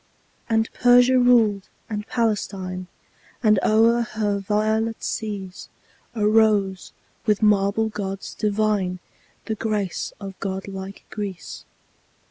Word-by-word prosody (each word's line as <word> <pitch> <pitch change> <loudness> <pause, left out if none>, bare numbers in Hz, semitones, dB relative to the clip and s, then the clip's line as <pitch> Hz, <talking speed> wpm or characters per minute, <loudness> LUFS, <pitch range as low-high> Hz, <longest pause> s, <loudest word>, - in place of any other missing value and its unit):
And 225 0 +2
Persia 245 +1 +5
ruled 225 -6 +3 0.2
and 210 -1 -5
Palestine; 195 -5 -2 0.6
And 215 -3 +5
o'er 230 +2 +4
her 215 -3 -1
violet 220 +3 0
seas 200 -4 -5 0.5
Arose, 210 -3 +2 0.4
with 210 0 +2
marble 210 +1 +3
gods 195 -2 -5
divine, 210 -3 0 0.5
The 220 - -2
grace 210 -4 -2
of 195 -2 -7
god 190 0 -4
like 195 0 -8
Greece. 200 -4 -6
210 Hz, 100 wpm, -23 LUFS, 195-220 Hz, 0.6 s, Persia